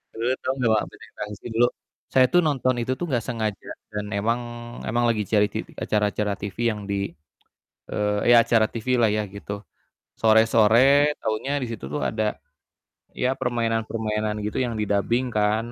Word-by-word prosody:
dulu, 115 +3 0
tau 130 - -1
engga 125 -3 +1
Mbak 110 - +3
Benteng - - -16
Takeshi 105 +1 -6
dulu, 120 +2 +4 0.4
Saya 130 -1 +4
tuh 175 - +5
nonton 130 -4 +1
itu 120 +2 -1
tuh 175 - -4
gak 120 -3 +1
sengaja, 110 -4 -3 0.2
dan 105 -1 -3
emang 110 +4 0 0.5
emang 120 +2 +1
lagi 110 -3 0
cari 105 -1 +3
titi - - -6
acara-acara 105 -1 0
TV 100 -1 -6
yang 105 - -5
di, 100 -2 -1 0.8
eee, 105 0 0 0.2
ya - - +9
acara 115 -1 +3
TV-lah 120 -1 +1
ya 105 - +1
gitu, 100 +1 -7 0.5
sore-sore 115 +6 +5
taunya 135 +7 -1
di 130 - -3
situ 105 -13 -7
tuh 75 - -2
ada, 110 -1 -1 0.8
ya 125 - +1
permainan-permainan 110 -3 -1
gitu 105 - -2
yang 120 -3 -1
didabing 110 +4 0
kan, 110 +2 0
110 Hz, 160 wpm, -24 LUFS, 105-120 Hz, 0.8 s, ya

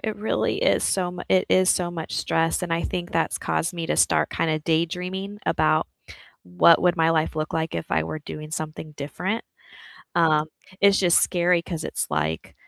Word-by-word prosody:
it 220 -1 -2
really 215 +1 -1
is - - +3
so, 185 -2 +1
m 175 0 -7
it 185 - +3
is 185 0 +4
so 175 -2 +2
much 165 -2 -6
stress 165 +2 0
and 170 - -2
I 165 0 0
think 175 -1 -4
that's 165 - 0
caused 175 +2 -2
me 165 -1 -4
to - - -1
start - - +2
kinda 155 -1 -1
daydreaming 180 +5 -2
about 155 0 +2 0.5
what 90 - +4
would 180 0 +3
my 165 -1 +3
life 160 -1 0
look 155 0 -3
like 160 0 -2
if 85 - -5
I 80 - +2
were 80 - -5
doing 155 0 -9
something 155 0 -6
different, 180 +10 -3 0.7
um, 155 -3 +3 0.3
it's 200 0 +5
just 180 -2 +4
scary 175 -1 +2
'cause 165 -3 -5
it's, - - -3
like, 80 +1 -2
165 Hz, 190 wpm, -24 LUFS, 155-180 Hz, 0.7 s, it's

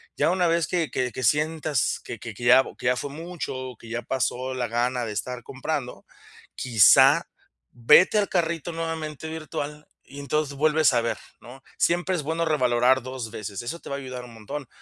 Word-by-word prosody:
Ya - - +2
una 180 -1 +2
vez 165 -2 +1
que 170 -5 -1
que 125 -1 -1
que 130 - -6
sientas 150 +2 +1
que 115 - -7
que 115 -2 -7
que 120 - -10
ya 125 +2 +7
que - - -3
ya 125 - +3
fue 145 - -4
mucho 165 +1 -6
o 130 -2 -7
que 115 - -13
ya 120 +1 -3
pasó 130 +1 -2
la 125 -2 -2
gana 120 +2 -1
de 110 - -5
estar 125 +4 -4
comprando, 135 -1 -5 0.5
quizá 115 -7 +5 0.4
vete 150 - +5
al 205 -1 +1
carrito 170 -2 -1
nuevamente 160 -2 -4
virtual 150 -1 -6 0.2
y 140 +1 -11
entonces 145 +1 -2
vuelves 155 +1 +3
a - - +3
ver, 115 - -2 0.2
¿no? 130 +3 -13
Siempre 175 +2 +1
es 155 - -3
bueno 165 +2 -1
revalorar 130 -3 +3
2 125 -3 -6
veces. 105 -3 -6
Eso 125 +8 -5
te - - -11
va 140 - -2
a - - -4
ayudar 130 -2 -7
un 120 - -13
montón, 115 +5 -7
135 Hz, 200 wpm, -25 LUFS, 125-160 Hz, 0.5 s, ya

